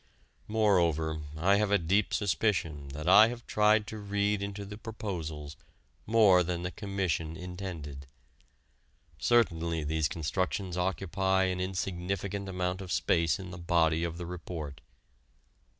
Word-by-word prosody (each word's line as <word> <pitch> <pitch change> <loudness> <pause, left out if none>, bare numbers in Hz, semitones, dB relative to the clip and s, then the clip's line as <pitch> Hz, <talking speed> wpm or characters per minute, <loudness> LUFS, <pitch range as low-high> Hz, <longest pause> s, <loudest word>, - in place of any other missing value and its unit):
Moreover, 85 -8 +2 0.2
I 95 +5 +4
have 105 -1 +1
a 100 - +4
deep 95 +4 +1
suspicion 95 -8 0
that 75 +3 -6
I 110 +1 +8
have 120 0 -6
tried 105 0 +3
to 110 0 -7
read 100 0 0
into 100 0 -5
the 105 +1 -8
proposals 80 -10 -5 0.5
more 105 -5 +6
than 90 0 -2
the 90 - -3
Commission 90 -5 -2
intended. 90 -7 -7 1.1
Certainly 85 -8 +2
these 80 0 0
constructions 90 +3 -2
occupy 95 +1 0
an 90 -1 -1
insignificant 95 +1 -3
amount 90 0 -2
of 95 -2 -7
space 85 -4 +2
in 95 -2 -8
the 90 - -8
body 85 -2 +2
of 85 -1 -3
the 85 - -5
report. 80 -6 -6
90 Hz, 135 wpm, -30 LUFS, 80-100 Hz, 1.1 s, I